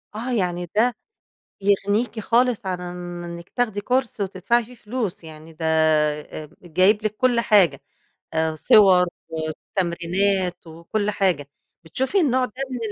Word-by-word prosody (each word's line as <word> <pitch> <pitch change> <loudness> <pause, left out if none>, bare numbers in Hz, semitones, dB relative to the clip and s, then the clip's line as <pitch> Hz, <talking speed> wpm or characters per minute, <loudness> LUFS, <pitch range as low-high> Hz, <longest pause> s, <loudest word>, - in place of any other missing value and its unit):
آه 240 +4 -4
يعني 180 -5 -1
ده 235 +2 +3 0.7
يغنيكِ 205 +3 +1
خالص 235 -1 +1
عن 180 -1 -2 0.4
إنِك 170 0 -8
تاخدي 220 -5 -1
كورس 250 0 -1
وتدفعي 200 +5 0
فيه 250 +3 -14
فلوس 215 -6 -4
يعني، 155 0 -11
ده 160 +1 -7
آآ 155 -1 +1
جايب 185 +5 +2
لِك 215 0 -1
كل 245 -1 +2
حاجة 190 - +4 0.5
آآ 160 0 +1
صور 185 0 +6 0.2
وتمرينات 175 +3 -2
وكل 170 +6 -3
حاجة، 185 -8 0 0.4
بتشوفي 265 - 0
النوع 260 -5 +2
ده 250 - -6 0.2
من 255 - -3
195 Hz, 130 wpm, -23 LUFS, 165-225 Hz, 0.7 s, صور